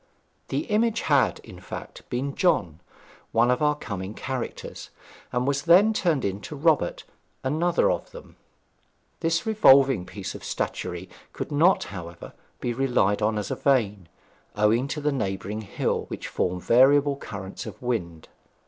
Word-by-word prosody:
The - - -1
image 225 +1 +1
had, 130 - +2
in - - -12
fact, - - -9
been 135 +3 -2
John, 85 - +1 0.5
one 120 +2 +3
of 125 - 0
our 150 0 +3
coming 100 -7 -6
characters, 130 -2 -5 0.4
and 125 0 0
was 140 0 0
then 185 +8 +6
turned 170 - +1
into 100 +9 -4
Robert, 155 +1 +1 0.4
another 160 +6 +2
of - - -3
them. - - -13 0.8
This 165 0 0
revolving 135 - +5
piece 95 -2 -6
of - - -10
statuary 90 0 -4 0.3
could - - -5
not, 165 +6 +4
however, 85 -3 -9 0.3
be 120 - -2
relied 120 -5 +1
on 110 +1 +1
as 105 -2 -3
a - - 0
vane, 105 - +1 0.5
owing 110 +5 +2
to 150 +2 -4
the 150 +1 +1
neighbouring 105 -4 -3
hill, 100 - -2
which - - -6
formed 90 0 -2
variable 140 +3 +5
currents 100 -7 -7
in - - -6
the - - -12
wind. 85 -10 -3
125 Hz, 150 wpm, -25 LUFS, 100-150 Hz, 0.8 s, then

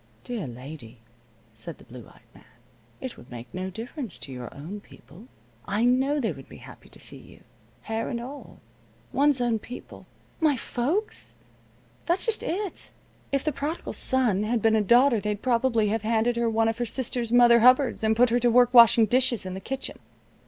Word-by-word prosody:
"Dear 235 - -4
lady," 125 -1 -10 0.6
said 115 +8 -9
the - - -17
blue 120 -2 -12
eyed - - -20
man, - - -18 0.6
"it 260 - -7
would 120 - -15
make 120 0 -10
no 185 +1 -4
difference 230 - -7
to 140 - -8
your 125 -2 -7
own 170 +9 -8
people. 200 +1 -17 0.4
I 210 +4 +1
know 265 +4 +2
they 235 - 0
would - - -11
be - - -12
happy - - -14
to - - -15
see - - -7
you, - - -17 0.4
hair 225 0 -3
and 235 - -3
all. 265 +4 -9 0.6
One's 285 -1 +3
own 240 -2 0
people 250 +4 -11 0.2
" - - -34
"My 285 - 0
folks? 305 - -3 0.7
That's 350 +2 +2
just 455 -2 0
it. 390 +2 -4 0.4
If 275 -1 0
the 305 - 0
Prodigal 295 +5 -4
Son 245 -7 0
had 225 +3 0
been 220 0 +3
a 220 - +3
daughter 240 +3 +4
they'd 210 0 -3
probably 230 -3 +2
have 225 +1 -1
handed 225 +2 +1
her 235 0 +1
one 225 0 +1
of 225 +1 -2
her 240 - 0
sister's 240 0 -3
mother 240 -1 +6
hubbards, 255 +1 +4
and 220 0 +3
put 240 +1 +4
her 240 - +3
to 240 0 +2
work 245 +1 +4
washing 235 -1 +8
dishes 245 -1 +2
in 185 - -5
the 190 - -5
kitchen. 270 +7 -5
235 Hz, 195 wpm, -26 LUFS, 210-255 Hz, 0.7 s, washing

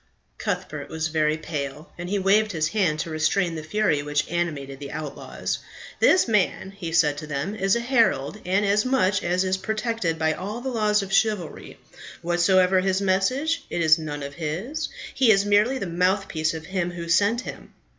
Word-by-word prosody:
Cuthbert 180 -8 -4
was 160 0 -2
very 155 -1 +1
pale, 150 0 -5
and 175 +1 -6
he 205 - 0
waved 205 +2 +3
his 155 -1 0
hand 180 -6 +1
to 165 - -5
restrain 165 +3 +1
the 160 - -5
fury 160 -2 +1
which 145 0 -1
animated 145 -6 -3
the 140 -1 -7
outlaws. 150 -2 -4 0.4
"This 370 - +5
man," 200 -3 +1
he 190 -4 -6
said 150 -3 +3
to 155 - -8
them, 145 +7 -3
"is 195 -1 +1
a 235 - 0
herald, 230 - +1
and, 190 +3 +1
as 205 +1 +3
such, 210 -6 +1
is 185 +2 0
protected 220 -4 -2
by 160 0 +1
all 205 +8 -5
the 265 +2 -4
laws 210 -3 +2
of 195 0 -6
chivalry. 210 -7 0 0.5
Whatsoever 180 +2 +3
his 190 0 +1
message, 200 +12 +1
it 175 - -2
is 155 0 +5
none 145 -2 -5
of 140 0 -6
his. 175 - -4 0.2
He 260 -4 +3
is 200 -2 +5
merely 210 +6 +3
the 225 - -3
mouthpiece 180 -2 0
of 160 -1 -7
him 180 -1 -2
who 170 -1 -6
sent 205 +8 +3
him." - - -9
185 Hz, 185 wpm, -24 LUFS, 155-205 Hz, 0.5 s, This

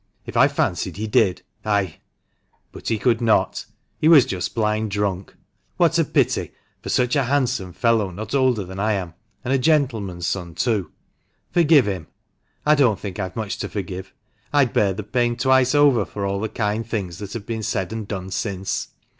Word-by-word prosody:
If - - -8
I - - +6
fancied - - -1
he 110 - -3
did, 105 -3 +2 0.2
I 100 -6 0 0.4
— - - -44
but - - -10
he 115 - +1
could 115 +1 +1
not. 115 -2 +1 0.3
He 155 - +2
was 155 -6 +8
just 95 -7 -4
blind 110 -1 0
drunk. 100 -2 -2 0.4
What - - +3
a - - +5
pity, - - 0 0.3
for - - -7
such 125 +2 +2
a 140 -3 +2
handsome 125 -8 0
fellow, 115 0 +1
not 105 +6 -7
older 130 -6 +2
than 95 +1 -8
I 105 +2 +1
am, 90 -4 -3 0.3
and 130 - 0
a 135 - +3
gentleman's 115 - +1
son, 85 -3 -3
too! 105 -9 0 0.6
Forgive 160 -5 +5
him! 90 -6 -3 0.6
I 150 - +6
don't 130 -9 +3
think 100 -2 -6
I've 95 -2 -4
much 105 -2 -4
to - - -3
forgive. 95 -1 -5 0.4
I'd 140 -5 +3
bear 100 -2 +3
the 105 +3 -5
pain 120 +2 0
twice 130 +1 +3
over 140 -7 +5
for 100 +2 -5
all 100 0 -1
the 110 +1 -2
kind 105 +1 -1
things 100 -7 -4
that 100 -2 -7
have 115 -3 -6
been 115 -1 -3
said 95 -2 -2
and 110 -2 -5
done 95 -2 -5
since! 95 -1 -2
105 Hz, 190 wpm, -22 LUFS, 95-125 Hz, 0.6 s, was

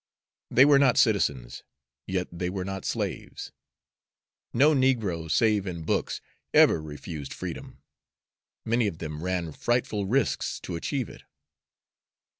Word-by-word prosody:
They 130 - +6
were 145 -1 +6
not 130 -3 +4
citizens, 70 - +1 0.5
yet 95 -1 -1
they 90 +1 -3
were 95 0 -4
not 95 0 -5
slaves. - - -4 1.0
No 145 +6 +5
negro, 110 - +1
save 105 +3 +2
in 85 -3 -5
books, - - -1 0.3
ever 80 - +6
refused 75 -1 -7
freedom; - - -7 0.8
many 115 0 +2
of 85 - -4
them 75 -2 -6
ran 90 -2 -2
frightful 110 +1 -1
risks 135 +7 0
to - - -5
achieve 130 - -2
it. - - -12
95 Hz, 125 wpm, -27 LUFS, 85-120 Hz, 1.0 s, They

